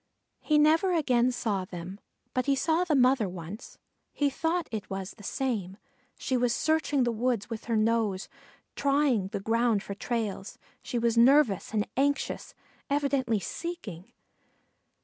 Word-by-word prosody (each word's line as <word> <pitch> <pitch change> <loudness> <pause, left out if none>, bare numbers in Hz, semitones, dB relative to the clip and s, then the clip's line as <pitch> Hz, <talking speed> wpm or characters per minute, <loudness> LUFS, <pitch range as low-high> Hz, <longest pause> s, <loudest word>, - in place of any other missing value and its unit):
He 305 - +2
never 320 +5 +4
again 255 -6 +2
saw 215 -6 -1
them; 185 +1 -8 0.3
but 255 +2 -1
he 280 - +3
saw 320 +6 +1
the 335 -4 +1
mother 255 -5 +3
once 180 +6 -9 0.3
he 285 -1 0
thought 335 +4 -1
it 215 -3 -5
was 195 0 -4
the 210 - -15
same 200 -6 -2 0.4
she 260 - -2
was 245 -1 +2
searching 310 -4 +1
the 240 - +1
woods 235 -1 -1
with 225 - -5
her 230 - 0
nose, 215 -3 +1 0.5
trying 275 -8 +2
the 200 +1 -4
ground 225 0 +1
for 200 - -5
trails; 210 -2 -3 0.2
she 245 - -4
was 235 0 +2
nervous 255 -5 +4
and 215 -1 0
anxious, 280 +1 -1 0.3
evidently 275 -6 +1
seeking. 205 - -6
235 Hz, 150 wpm, -28 LUFS, 205-280 Hz, 0.5 s, never